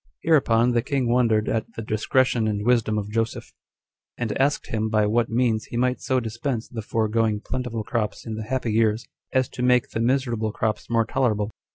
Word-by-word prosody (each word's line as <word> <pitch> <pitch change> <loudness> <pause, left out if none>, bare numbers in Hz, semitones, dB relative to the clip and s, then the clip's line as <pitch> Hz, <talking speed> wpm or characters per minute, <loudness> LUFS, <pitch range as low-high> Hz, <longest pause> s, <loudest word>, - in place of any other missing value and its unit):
7. 165 - -1
Hereupon 120 -5 +4
the 120 -1 +2
king 135 -1 -1
wondered 115 -3 +2
at 115 0 -2
the 115 - -5
discretion 110 +2 +1
and 105 -1 -2
wisdom 115 -3 +2
of 105 0 -3
Joseph; 115 +1 -2 0.6
and 120 -3 -2
asked 145 +2 0
him 110 0 -1
by 110 -1 +2
what 115 +2 +1
means 115 -2 +1
he 120 - -6
might 125 +1 +1
so 130 -1 +1
dispense 120 +1 -3
the 115 - -6
foregoing 110 0 0
plentiful 115 -2 -3
crops 110 -2 -3
in 110 - -4
the 110 0 -5
happy 125 -1 -1
years, 110 0 +2 0.3
as 130 -1 +2
to - - -7
make 125 -1 +3
the - - -3
miserable 120 -3 0
crops 110 0 -2
more 115 -1 +2
tolerable. 110 -4 0
115 Hz, 195 wpm, -24 LUFS, 110-125 Hz, 0.6 s, Hereupon